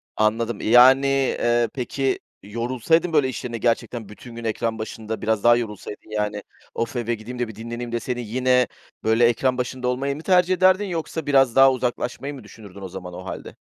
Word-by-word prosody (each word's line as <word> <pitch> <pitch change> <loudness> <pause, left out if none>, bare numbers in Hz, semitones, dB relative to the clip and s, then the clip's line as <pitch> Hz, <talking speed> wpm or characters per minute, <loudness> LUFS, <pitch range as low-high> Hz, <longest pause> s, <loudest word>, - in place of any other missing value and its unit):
Anladım. 110 +1 0
Yani, 130 +4 +6 0.3
eee, 120 0 +2
peki, 135 +1 -1 0.2
yorulsaydın, 125 - 0
böyle, 145 -4 +3
iş 125 - -6
yerinde 120 -2 -4
gerçekten 115 -2 -1
bütün 115 +3 -12
gün 115 - -7
ekran 115 0 -2
başında, 110 0 -5
biraz 110 -2 0
daha 120 0 +7
yorulsaydın, 105 -3 -6
yani, 105 -1 -2 0.3
"Of, 115 +2 -3
eve 120 -1 -1
gideyim 120 +3 -9
de 120 - 0
bir 110 - -10
dinleneyim." 120 +2 -6
deseydin 120 +1 -3
yine, 125 +2 +2 0.4
böyle, 110 +2 +4
ekran 125 +2 +2
başında 125 0 -3
olmayı 135 +3 -1
mı 150 - -8
tercih 180 +1 +3
ederdin 185 +2 +4
yoksa 165 -3 -4
biraz 135 -4 +3
daha 135 0 +7
uzaklaşmayı 125 +2 -3
mı 135 -4 -10
düşünürdün 100 -2 -13
o 95 - -5
zaman, 90 -1 -8
o 90 +1 -8
hâlde. - - -7
120 Hz, 185 wpm, -23 LUFS, 110-130 Hz, 0.4 s, daha